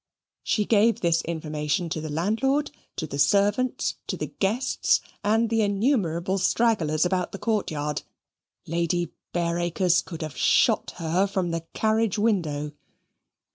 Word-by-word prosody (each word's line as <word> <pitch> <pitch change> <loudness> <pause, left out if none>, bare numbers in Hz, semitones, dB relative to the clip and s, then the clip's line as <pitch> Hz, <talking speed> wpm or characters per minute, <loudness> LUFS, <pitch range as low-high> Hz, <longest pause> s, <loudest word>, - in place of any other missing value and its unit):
She 210 - 0
gave 225 +2 +3
this 170 -1 +2
information 155 +1 -2
to 155 - -3
the 155 - -5
landlord, 225 - 0 0.2
to 160 - -3
the 140 -2 -6
servants, 205 - +2
to - - -3
the - - -5
guests, 220 +7 +2 0.2
and 220 +3 +2
the 225 0 +1
innumerable 195 - +1
stragglers 180 -7 +2
about 180 0 0
the - - -4
courtyard. 155 -10 -1 0.6
Lady 170 +1 -1 0.2
Bareacres 175 +1 +1
could 165 -2 -7
have 155 -3 -6
shot - - +3
her 175 +3 +1
from 190 -3 -1
the 165 0 -4
carriage 220 -1 +1
window. 165 -9 0
180 Hz, 135 wpm, -25 LUFS, 165-215 Hz, 0.6 s, gave